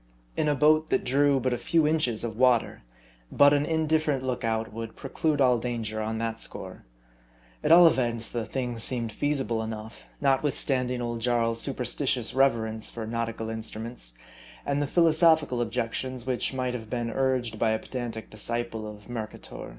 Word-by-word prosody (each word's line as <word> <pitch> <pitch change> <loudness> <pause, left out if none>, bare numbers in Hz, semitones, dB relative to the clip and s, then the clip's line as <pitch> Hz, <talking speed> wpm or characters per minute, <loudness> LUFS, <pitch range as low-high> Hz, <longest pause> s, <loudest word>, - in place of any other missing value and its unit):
In - - 0
a 145 - +2
boat 155 +3 +4
that - - +1
drew 140 +2 +3
but 130 0 0
a 120 - -2
few 165 -2 +2
inches 150 -9 +1
of 115 -2 -4
water, 125 -1 +2 0.5
but 145 0 +6
an 145 0 +1
indifferent 155 -3 +1
look 125 -2 -2
out 110 -1 -1
would 115 0 -6
preclude 150 +2 -1
all 125 -3 +4
dan 120 -1 -3
ger 110 0 -3
on 110 +1 -2
that 115 0 -3
score. - - -7 0.8
At - - +2
all 175 +1 +9
events, 120 -7 +2
the 120 -2 -3
thing 125 0 -4
seemed 115 -1 -2
feasible 135 -2 -1
enough, 110 - -7
notwithstanding 130 - +1
old 120 -1 -3
Jarl's 115 -1 +1
superstitious 130 -2 -1
reverence 115 -5 +1
for 115 -2 -6
nautical 115 0 -3
instruments, 110 - -6 0.5
and 140 0 0
the 145 - 0
philosophical 160 -5 +3
objections 125 +1 -3
which 130 -2 0
might 130 -2 -2
have 110 -3 -6
been 120 -1 -2
urged 125 -4 0
by 115 - +2
a 110 - +2
pedantic 115 -2 -6
disciple 110 0 -4
of 105 -1 -11
Mer 115 -3 -4
cator. - - -10
120 Hz, 170 wpm, -27 LUFS, 115-135 Hz, 0.8 s, all